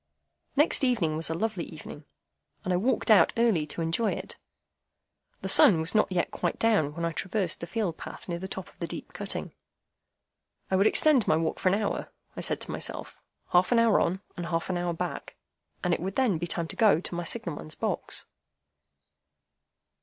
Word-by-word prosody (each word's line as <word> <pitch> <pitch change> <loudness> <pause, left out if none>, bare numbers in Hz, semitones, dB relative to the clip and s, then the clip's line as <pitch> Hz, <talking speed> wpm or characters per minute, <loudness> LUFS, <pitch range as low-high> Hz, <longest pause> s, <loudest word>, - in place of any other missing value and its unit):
Next 295 0 +4
evening 215 -12 +2
was 160 +1 -3
a 165 - -1
lovely 195 -1 -2
evening, 150 -1 -10 0.6
and 185 - 0
I - - +3
walked 230 +3 +1
out 190 -6 +6
early 215 -10 +2
to 165 +3 -3
enjoy 175 +7 +1
it. - - -7 1.1
The - - -3
sun 175 -7 +6
was 160 +2 -1
not 215 -2 +3
yet 175 -2 0
quite - - -2
down 200 -11 +2
when 170 0 -2
I 165 - 0
traversed 185 0 -2
the 170 - -6
field 190 -3 -2
path - - -9
near 170 -1 -3
the 190 - -5
top 190 -1 -6
of - - -21
the - - -3
deep - - -8
cutting. - - -5 1.2
I - - +3
would 195 +3 +4
extend 290 -8 +4
my 155 - +4
walk 160 0 -1
for 185 - +3
an 190 - +3
hour, 210 - -3 0.2
I - - -5
said - - -1
to - - -4
myself, - - -5 0.3
half 180 +4 +4
an 240 - +4
hour 230 -2 +4
on 185 +3 0
and 175 -1 -5
half 165 +3 -1
an 180 - -1
hour 175 0 -1
back, 175 +1 -5 0.5
and 180 -1 +2
it - - 0
would 190 +3 -4
then 235 -11 +2
be 175 - -3
time 170 -1 -2
to - - -6
go 215 -8 +5
to 180 - -5
my 175 0 -2
signal 170 -4 0
man's 155 0 -7
box. - - -3
180 Hz, 205 wpm, -28 LUFS, 165-215 Hz, 1.2 s, out